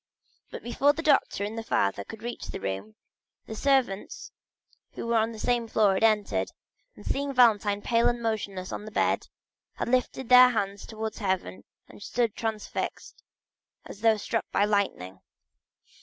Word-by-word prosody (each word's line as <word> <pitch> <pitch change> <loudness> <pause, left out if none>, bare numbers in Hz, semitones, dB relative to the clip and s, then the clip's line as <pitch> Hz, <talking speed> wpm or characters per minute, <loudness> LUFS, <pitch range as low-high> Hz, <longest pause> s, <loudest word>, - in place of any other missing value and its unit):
But - - -8
before 275 +4 +2
the 325 +2 -5
doctor 290 -9 +2
and 210 +2 -4
the 225 - -3
father 100 - 0
could 220 - -11
reach 240 0 -5
the - - -6
room, 95 +3 -5 0.5
the - - -7
servants 250 -5 0 0.6
who - - -6
were 230 0 +2
on 225 +1 +1
the 225 - -9
same 240 +1 0
floor 210 -3 +3
had 190 - -1
entered, 215 -2 +2 0.4
and - - -14
seeing 280 0 -1
Valentine 210 -4 +4
pale 235 0 +3
and 240 0 -2
motionless 200 -5 -3
on - - -4
her - - -7
bed, 215 - 0 0.5
they - - -2
lifted 255 +1 0
up - - -17
their 250 0 +9
hands 200 -4 -3
towards 220 -1 -5
heaven 190 -2 -2 0.2
and - - -15
stood 230 0 -1
transfixed, 220 -2 -4 0.6
as 205 - -11
though 225 -1 +4
struck 225 +2 -3
by 200 - +3
lightening. 190 - -1
220 Hz, 170 wpm, -27 LUFS, 200-240 Hz, 0.6 s, their